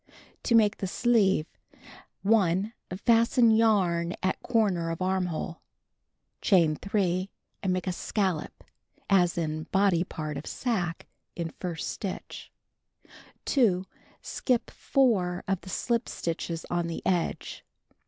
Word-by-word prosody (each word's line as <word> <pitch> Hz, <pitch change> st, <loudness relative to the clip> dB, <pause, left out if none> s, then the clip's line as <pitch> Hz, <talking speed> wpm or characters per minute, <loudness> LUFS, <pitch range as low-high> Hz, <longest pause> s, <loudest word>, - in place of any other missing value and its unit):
To 235 Hz, -, +3 dB
Make 210 Hz, -2 st, +4 dB
the 195 Hz, -, -3 dB
Sleeve: 200 Hz, -6 st, +2 dB, 0.8 s
1. 200 Hz, 0 st, +2 dB, 0.3 s
Fasten 230 Hz, 0 st, +5 dB
yarn 190 Hz, -7 st, +2 dB
at 185 Hz, -, 0 dB
corner 200 Hz, -8 st, +1 dB
of 165 Hz, -, -3 dB
armhole. 185 Hz, -2 st, -2 dB, 0.8 s
Chain 170 Hz, -7 st, +4 dB
3, 190 Hz, -1 st, -1 dB, 0.3 s
and 190 Hz, -, 0 dB
make 185 Hz, -1 st, -1 dB
a 185 Hz, -, 0 dB
scallop 185 Hz, -3 st, -2 dB, 0.5 s
(as 180 Hz, -3 st, +4 dB
in 155 Hz, -1 st, -2 dB
body 190 Hz, -3 st, +3 dB
part 155 Hz, -4 st, -5 dB
of 140 Hz, -, -7 dB
sacque) 180 Hz, -9 st, -2 dB, 0.3 s
in 170 Hz, -2 st, -3 dB
first 170 Hz, -4 st, -4 dB
stitch. 195 Hz, -3 st, -6 dB, 0.9 s
2. 195 Hz, -9 st, +2 dB, 0.4 s
Skip 250 Hz, -3 st, -1 dB
4 190 Hz, -10 st, +1 dB
of 195 Hz, -1 st, 0 dB
the 185 Hz, -, -11 dB
slip 235 Hz, +5 st, -1 dB
stitches 165 Hz, 0 st, -4 dB
on 175 Hz, -1 st, 0 dB
the 165 Hz, -, -5 dB
edge. 175 Hz, -3 st, -1 dB
185 Hz, 120 wpm, -28 LUFS, 170-220 Hz, 0.9 s, Fasten